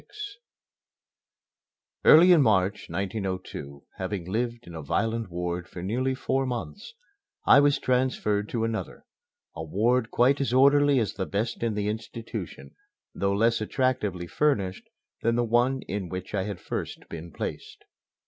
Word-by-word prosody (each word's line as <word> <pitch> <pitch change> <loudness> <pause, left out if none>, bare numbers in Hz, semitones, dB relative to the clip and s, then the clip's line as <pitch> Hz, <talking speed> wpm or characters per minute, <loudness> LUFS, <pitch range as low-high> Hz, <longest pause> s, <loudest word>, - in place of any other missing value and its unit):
XXVI 415 -1 -9 1.7
Early 175 +4 +8
in 170 -4 +7
March, 100 -4 +1
1902, 95 -8 -4
having 95 -1 -3
lived 115 +4 -2
in 85 - -11
a 80 - -6
violent 115 +8 -1
ward 90 0 -3
for 90 - -8
nearly 130 +7 0
four 135 0 -1
months, 165 - -6 0.5
I 140 - +8
was 145 0 +4
transferred 125 -5 0
to 115 -2 -1
another 115 -1 -4 0.5
a 80 - -5
ward 115 +8 +1
quite 135 +4 +3
as 130 -3 0
orderly 140 +1 +5
as 110 -5 0
the 95 -1 -4
best 110 +4 -2
in 115 -2 0
the 105 -1 -1
institution, 110 +1 -6 0.4
though 100 0 0
less 115 +2 +2
attractively 105 -7 -1
furnished 100 - -1 0.3
than 115 +1 +1
the 120 - +2
one 120 +3 +2
in 95 -3 -4
which 95 +1 -6
I 95 -2 0
had 100 -4 -5
first - - -5
been 85 +1 -8
placed. - - -6
110 Hz, 150 wpm, -27 LUFS, 95-130 Hz, 1.7 s, Early